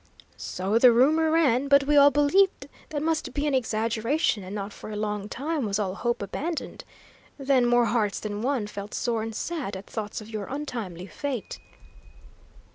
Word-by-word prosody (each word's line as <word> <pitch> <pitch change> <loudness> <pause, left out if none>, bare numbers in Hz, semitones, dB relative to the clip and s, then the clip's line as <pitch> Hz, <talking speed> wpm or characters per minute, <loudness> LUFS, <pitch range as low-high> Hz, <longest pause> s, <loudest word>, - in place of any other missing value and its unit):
"So 195 +5 -1
the 250 0 +8
rumour 305 +7 +4
ran, 280 -5 +3
but 280 0 +5
we 295 +2 +1
all 285 0 +8
believed 295 +2 +2 0.2
that 295 -1 -3
must 320 0 -1
be 290 0 0
an 295 - 0
exaggeration, 230 - 0
and 190 +3 -7
not 200 0 -5
for - - -10
a 215 - -5
long 210 -1 -3
time 295 +4 -2
was 200 -2 -1
all 195 -3 -1
hope 235 +1 -2
abandoned. 315 - -4 0.5
Then, 265 -3 +2
more 240 0 +4
hearts 215 -4 0
than 210 -1 -4
one 255 -3 0
felt 205 0 -7
sore 230 -2 -1
and 225 0 -5
sad 290 - -3
at 190 - -10
thoughts 210 -2 -5
of 215 - -10
your 215 -2 -5
untimely 230 - -5
fate." 255 +2 -5
240 Hz, 180 wpm, -26 LUFS, 210-285 Hz, 0.5 s, the